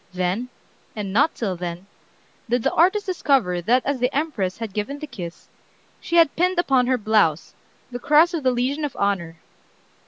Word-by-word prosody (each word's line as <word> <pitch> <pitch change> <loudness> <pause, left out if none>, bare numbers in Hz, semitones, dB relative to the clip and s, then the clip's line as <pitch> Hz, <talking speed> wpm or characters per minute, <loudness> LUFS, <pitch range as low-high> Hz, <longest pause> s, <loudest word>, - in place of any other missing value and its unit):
Then, 185 +7 -1 0.5
and 200 -3 -5
not 285 +9 +3
till 195 -6 -2
then, 175 +1 -6 0.6
did 245 -1 +1
the - - +1
artist 380 +5 +3
discover 270 - +1
that 245 +8 +2
as 280 -2 -1
the 250 +2 +1
Empress 265 - -2
had 225 -4 -6
given 215 +8 -3
the 305 - -6
kiss, 180 - -9 0.5
she 340 - -4
had 335 -4 +5
pinned 365 +2 +1
upon 265 -7 +2
her 255 0 +2
blouse 210 -8 +1 0.4
the 245 - -5
Cross 305 +7 +4
of 330 - -2
the 260 - +2
Legion 255 +5 -1
of 290 -4 -3
Honor." 185 -5 -1
245 Hz, 180 wpm, -22 LUFS, 195-295 Hz, 0.6 s, had